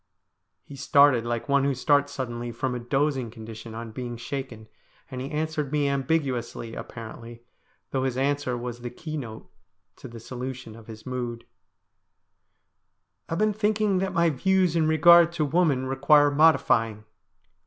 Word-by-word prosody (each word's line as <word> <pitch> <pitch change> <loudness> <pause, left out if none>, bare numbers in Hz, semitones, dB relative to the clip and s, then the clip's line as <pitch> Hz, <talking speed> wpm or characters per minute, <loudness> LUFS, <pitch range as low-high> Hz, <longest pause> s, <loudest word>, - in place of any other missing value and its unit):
He 140 - -12
started 140 -3 +4
like 120 +1 -3
one 140 -1 +3
who 140 -1 +1
starts 145 +2 +2
suddenly 120 -3 -4
from 125 +2 -3
a 125 - -3
dozing 135 0 -1
condition 110 0 -10
on 115 0 -7
being 120 0 -6
shaken, 120 -3 -6 0.4
and 130 -1 -5
he 135 - -5
answered 155 -2 -2
me 145 -1 +1
ambiguously, 130 -5 -2
apparently, 115 +1 -9 0.5
though 130 -1 -1
his 130 -1 -1
answer 140 -2 0
was 120 0 -6
the 120 - -5
key 155 +6 -7
note 115 -7 -7 0.5
to - - -10
the 115 -1 -10
solution 125 -1 -7
of 115 -1 -14
his 110 -1 -11
mood: 120 -2 -5 0.9
' - - -50
I've 165 - -2
been 215 +2 +2
thinking 210 -2 +1
that 190 0 -1
my 170 -1 +2
views 185 +4 +1
in 160 -2 +2
regard 170 +2 +6
to 160 -3 0
woman 150 -4 +1
require 140 +2 +4
modifying.' 115 -8 +3
130 Hz, 155 wpm, -26 LUFS, 120-150 Hz, 0.9 s, regard